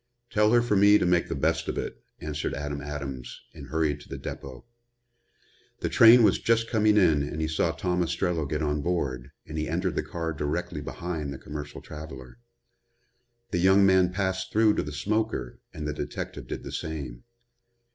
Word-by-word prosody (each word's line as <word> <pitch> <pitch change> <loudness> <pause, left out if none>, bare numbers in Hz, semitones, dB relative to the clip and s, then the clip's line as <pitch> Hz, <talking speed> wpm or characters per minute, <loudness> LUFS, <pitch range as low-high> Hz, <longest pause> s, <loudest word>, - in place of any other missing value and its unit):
"Tell 105 0 +3
her 120 0 +5
for 120 -3 +1
me 100 +1 +7
to - - 0
make 90 -1 +2
the - - -2
best 80 +4 0
of - - -3
it," - - -5 0.2
answered 75 -1 -3
Adam 70 0 -4
Adams 70 -4 -6
and - - -10
hurried 80 -2 0
to 75 - -15
the - - -5
depot. 65 -3 -8 1.2
The - - 0
train 115 +1 +8
was 100 -4 +4
just 115 0 +2
coming 105 -2 +4
in 80 -7 +4
and 75 +2 -4
he 80 - 0
saw 80 0 +1
Tom 90 -1 -1
Ostrello 85 -2 -1
get 75 +1 -1
on 75 0 0
board, 70 -7 -2 0.2
and 80 0 -5
he 75 - -2
entered 90 +3 -1
the - - 0
car 85 -4 -4
directly 75 +3 -3
behind 80 -5 -4
the 70 - -6
commercial 75 +1 -7
traveler. 75 - -10 1.1
The 85 - 0
young 95 +2 +5
man 95 -1 +4
passed 95 0 -2
through 110 0 +4
to - - +2
the 75 - -5
smoker 105 - -2
and 75 -1 -5
the 75 - -2
detective - - -5
did - - -5
the - - -7
same. 70 -7 -5
80 Hz, 185 wpm, -27 LUFS, 75-95 Hz, 1.2 s, train